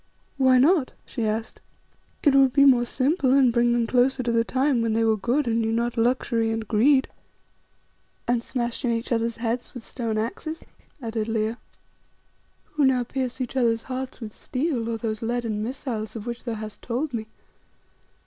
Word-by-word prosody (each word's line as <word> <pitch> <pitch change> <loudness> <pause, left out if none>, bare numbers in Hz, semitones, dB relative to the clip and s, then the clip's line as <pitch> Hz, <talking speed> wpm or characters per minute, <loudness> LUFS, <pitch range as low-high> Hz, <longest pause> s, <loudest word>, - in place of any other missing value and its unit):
"Why 260 -1 +5
not?" 290 +1 +3
she 230 -4 -3
asked. 220 +1 -3 0.6
"It 290 - +5
would 270 -2 +5
be 280 0 +6
more 250 -3 +5
simple 270 +2 +1
and 265 -3 +5
bring 240 0 +3
them 240 -1 +2
closer 255 +2 +2
to 235 - 0
the 230 0 +3
time 260 0 +1
when 230 -1 0
they 225 +1 +2
were 220 -1 +3
good 245 +7 0
and 230 -1 +1
knew 225 0 0
not 235 +1 0
luxury 230 -1 +1
and 225 -1 -3
greed." 260 +6 +4 1.2
"And 240 -1 +2
smashed 240 -1 -3
in 245 - +1
each 230 +1 -2
other's 230 -1 0
heads 235 +2 -3
with 245 - -7
stone 230 -3 -3
axes," 310 +9 -4 0.4
added 225 -1 -2
Leo. 225 0 -1 1.1
"Who 300 - 0
now 255 -2 +3
pierce 260 +1 -4
each 255 0 -4
other's 230 -3 +2
hearts 260 0 -5
with 220 -3 -7
steel, 255 -4 -2
or 230 - -2
those 220 -1 -3
leaden 230 -2 -2
missiles 235 -2 -4
of 220 -1 -6
which 240 0 -6
thou 235 -2 -2
hast 215 -1 -8
told 255 +4 -3
me. 220 -2 -3
240 Hz, 180 wpm, -25 LUFS, 225-260 Hz, 1.2 s, be